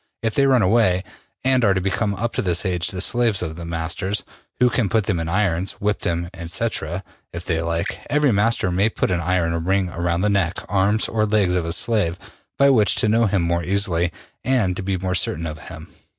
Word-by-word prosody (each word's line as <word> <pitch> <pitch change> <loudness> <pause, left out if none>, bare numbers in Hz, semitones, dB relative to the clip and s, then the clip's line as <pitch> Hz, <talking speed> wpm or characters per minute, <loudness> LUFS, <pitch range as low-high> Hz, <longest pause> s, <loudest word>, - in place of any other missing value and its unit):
If 110 -1 0
they 140 0 +3
run 130 -5 +4
away, 95 -2 +3 0.4
they 130 +1 +3
are 100 -4 +3
to - - +1
become 100 +2 -1
up 115 +4 -2
to - - -1
this 90 -3 -1
age 90 -2 0
the 90 - -3
slaves 115 -2 +2
of 80 -2 -4
their 85 0 -7
masters, 85 +4 -2 0.4
who 125 0 +4
can 115 -5 0
put 110 +1 +2
them 95 -4 -1
in 80 0 -3
irons, 95 -1 0
whip 105 0 -1
them, 85 0 -2 0.2
&c., 95 +7 -1 0.6
if 85 +1 -7
they 80 -2 0
like. 85 0 -2
Every 150 -2 +3
master 105 -2 +1
may 95 +5 +2
put 105 - -1
an 90 -1 0
iron 85 -1 0
ring 95 +1 +1
around 85 0 -1
the 105 - +2
neck, 95 -4 +1
arms 100 +2 +1
or 110 -1 0
legs 105 -4 +2
of 90 -2 0
his 85 +1 0
slave, 100 -7 +1 0.4
by 140 0 +5
which 110 -6 +3
to - - +1
know 115 +1 +3
him 95 -3 +1
more 85 0 0
easily 90 -2 0 0.3
and 115 -9 +1
to - - -4
be 95 0 -1
more 90 +1 -2
certain 85 -2 0
of 75 -1 -5
him. 85 -1 -9
95 Hz, 220 wpm, -22 LUFS, 85-110 Hz, 0.6 s, by